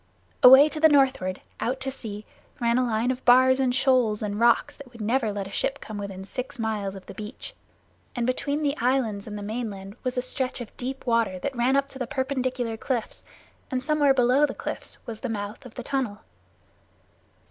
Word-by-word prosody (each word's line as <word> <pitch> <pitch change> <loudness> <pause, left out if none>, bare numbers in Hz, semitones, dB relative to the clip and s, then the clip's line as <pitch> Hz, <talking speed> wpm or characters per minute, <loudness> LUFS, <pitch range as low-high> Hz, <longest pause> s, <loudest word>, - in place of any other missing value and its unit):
Away 265 +3 +10
to 310 0 -5
the 315 0 +7
northward, 265 -10 +2 0.2
out 260 +2 -1
to 270 0 -2
sea, 215 -5 -7 0.3
ran 235 +1 +2
a 255 - +1
line 230 +2 +1
of 255 0 -5
bars 260 +2 +6
and 260 -1 +2
shoals 255 -5 +2
and 205 0 -3
rocks 235 +5 +3
that 270 -3 -13
would 235 - -14
never 225 +1 +1
let 200 -1 -4
a - - -11
ship 275 +6 -1
come 215 -1 -7
within 195 -1 -6
six 255 +5 -6
miles 215 -4 -2
of 190 - -10
the - - -9
beach, 215 +4 -8 0.6
and 240 -1 -1
between 285 +4 -1
the 285 0 +1
islands 235 -5 0
and 210 -1 -6
the 205 - -6
mainland 205 -3 -5
was 255 0 -2
a 250 - +1
stretch 255 0 -1
of 240 -3 -9
deep 260 +2 -5
water 230 -6 +1
that 270 +8 -4
ran 245 +3 +2
up 275 0 +2
to 270 - -10
the 250 - -2
perpendicular 255 -3 -2
cliffs, 240 -2 -3 0.4
and 255 -2 -2
somewhere 290 -1 +3
below 255 +3 +4
the 265 - -6
cliffs - - -5
was 225 -2 -6
the 255 - -4
mouth 205 -1 -5
of 235 - -17
the 250 - -6
tunnel. 255 -6 -2
245 Hz, 205 wpm, -26 LUFS, 215-265 Hz, 0.6 s, Away